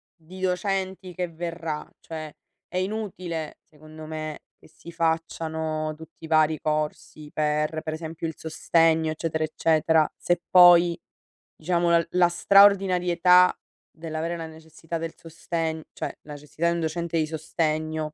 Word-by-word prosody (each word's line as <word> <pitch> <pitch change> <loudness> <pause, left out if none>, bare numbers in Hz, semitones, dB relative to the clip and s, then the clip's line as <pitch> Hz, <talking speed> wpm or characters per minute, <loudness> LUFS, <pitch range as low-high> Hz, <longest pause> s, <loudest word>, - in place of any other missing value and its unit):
di 180 +2 -13
docenti 190 0 -2
che 180 +1 -2
verrà, 165 -2 -5
cioè, 155 -2 -8 0.3
è - - -5
inutile 185 -5 -4
secondo 155 +1 -13
me, 155 -1 -6 0.2
che - - -19
si 170 - -13
facciano 160 -1 -2
tutti 160 +1 -15
i - - -8
vari 155 -1 +3
corsi, 150 0 -3
per 150 +1 -1
per 155 - -4
esempio 160 +1 -6
il 160 - -5
sostegno, 160 0 +2
eccetera, 160 0 -2
eccetera 155 0 +2
se 175 0 0
poi, 175 -1 +7 0.6
diciamo 170 +1 0
la 170 0 +4
la 180 -1 +4
straordinarietà 180 -2 +5 0.4
dell'avere 165 +1 -4
la 165 - -5
necessità 160 +1 -8
del 165 0 -5
sostegno, 165 -1 -4
cioè, - - -6
necessità 150 +2 -4
di 170 - +1
un - - -2
docente 170 +1 -2
di 155 -1 +1
sostegno, 155 0 -2
160 Hz, 135 wpm, -25 LUFS, 155-175 Hz, 0.6 s, poi